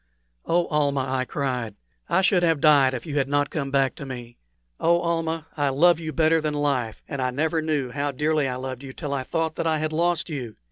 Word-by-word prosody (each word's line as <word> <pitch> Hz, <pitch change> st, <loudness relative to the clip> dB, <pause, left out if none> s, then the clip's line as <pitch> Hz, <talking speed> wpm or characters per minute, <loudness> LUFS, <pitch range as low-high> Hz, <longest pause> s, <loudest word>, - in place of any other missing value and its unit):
"Oh, 175 Hz, +1 st, +2 dB
Almah," 140 Hz, -3 st, +1 dB
I 130 Hz, -1 st, -1 dB
cried. 125 Hz, -6 st, -3 dB, 0.3 s
"I 190 Hz, -, +3 dB
should 185 Hz, -1 st, +4 dB
have 165 Hz, -3 st, +2 dB
died 140 Hz, -3 st, +5 dB
if 125 Hz, -, -6 dB
you 145 Hz, -2 st, -1 dB
had 135 Hz, -, 0 dB
not 145 Hz, 0 st, +1 dB
come 140 Hz, -3 st, -2 dB
back 135 Hz, -1 st, +2 dB
to 140 Hz, -, -7 dB
me! 120 Hz, -2 st, -8 dB, 0.4 s
Oh, 170 Hz, +1 st, +3 dB
Almah, 165 Hz, -2 st, -1 dB
I 145 Hz, -2 st, +1 dB
love 170 Hz, +5 st, +4 dB
you 160 Hz, -1 st, -4 dB
better 160 Hz, +1 st, +3 dB
than 150 Hz, -1 st, -1 dB
life 135 Hz, -7 st, -1 dB
and 140 Hz, -3 st, -4 dB
I 130 Hz, -, +1 dB
never 160 Hz, +5 st, 0 dB
knew 150 Hz, -5 st, -1 dB
how 145 Hz, +2 st, -1 dB
dearly 150 Hz, +1 st, +1 dB
I 125 Hz, -, -3 dB
loved 130 Hz, 0 st, -5 dB
you 135 Hz, -1 st, -9 dB
till 145 Hz, -2 st, -4 dB
I 140 Hz, -, -1 dB
thought 160 Hz, +4 st, -2 dB
that -, -, -1 dB
I 160 Hz, -1 st, +2 dB
had 155 Hz, 0 st, -2 dB
lost 170 Hz, +1 st, +1 dB
you! 130 Hz, -9 st, -5 dB
145 Hz, 230 wpm, -24 LUFS, 130-160 Hz, 0.4 s, died